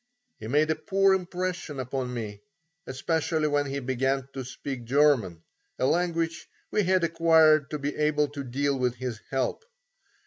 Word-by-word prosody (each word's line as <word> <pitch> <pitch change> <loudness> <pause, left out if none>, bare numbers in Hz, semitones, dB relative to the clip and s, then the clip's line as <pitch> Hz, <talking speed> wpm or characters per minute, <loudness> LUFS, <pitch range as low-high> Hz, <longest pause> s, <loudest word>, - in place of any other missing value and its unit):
He 110 - -7
made 150 +5 +2
a - - +1
poor 195 +4 +2
impression 180 -5 -3
upon 130 0 -3
me, 105 -4 -5 0.5
especially 155 +3 0
when 145 -1 +1
he 140 0 -3
began 135 +1 -1
to 135 - -5
speak 130 0 -6
German, 120 - +2 0.3
a - - 0
language 165 +1 0 0.2
which 210 - +1
he - - -2
had 185 -2 +3
acquired 160 -3 +4
to 150 - -3
be 145 0 -3
able 150 -1 +2
to 145 -1 -6
deal 135 +2 -1
with 125 -1 0
his 125 -3 -5
help. 135 - -1
145 Hz, 165 wpm, -27 LUFS, 130-160 Hz, 0.5 s, acquired